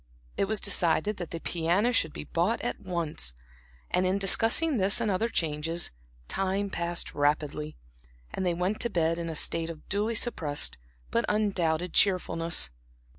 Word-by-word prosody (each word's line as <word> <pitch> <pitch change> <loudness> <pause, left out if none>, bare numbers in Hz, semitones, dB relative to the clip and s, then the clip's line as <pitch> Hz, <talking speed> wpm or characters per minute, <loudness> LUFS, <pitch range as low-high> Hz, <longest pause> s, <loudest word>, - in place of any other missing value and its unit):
It - - +1
was 215 +1 +2
decided 200 +2 +3
that 175 -3 -6
the 165 - -5
piano 175 +9 0
should 165 -10 +1
be - - -7
bought 175 +9 0
at 240 - -3
once, 160 - -1 0.6
and 180 - +2
in 185 +1 +1
discussing 225 - +5
this 195 +2 +2
and 225 -3 0
other 220 +5 0
changes, 165 -1 -1 0.4
time 195 +1 -2
passed 170 0 -2
rapidly, 150 +1 -1 0.6
and - - -3
they 175 -2 0
went 185 +5 -1
to 235 - 0
bed 165 -4 0
in 165 -1 -4
a 160 - -5
state 165 +2 0
of 160 -2 -10
duly 210 +3 -1
suppressed, 150 - -1 0.3
but 235 - +1
undoubted 180 -5 0
cheerfulness. 165 - +2
180 Hz, 160 wpm, -28 LUFS, 165-205 Hz, 0.6 s, discussing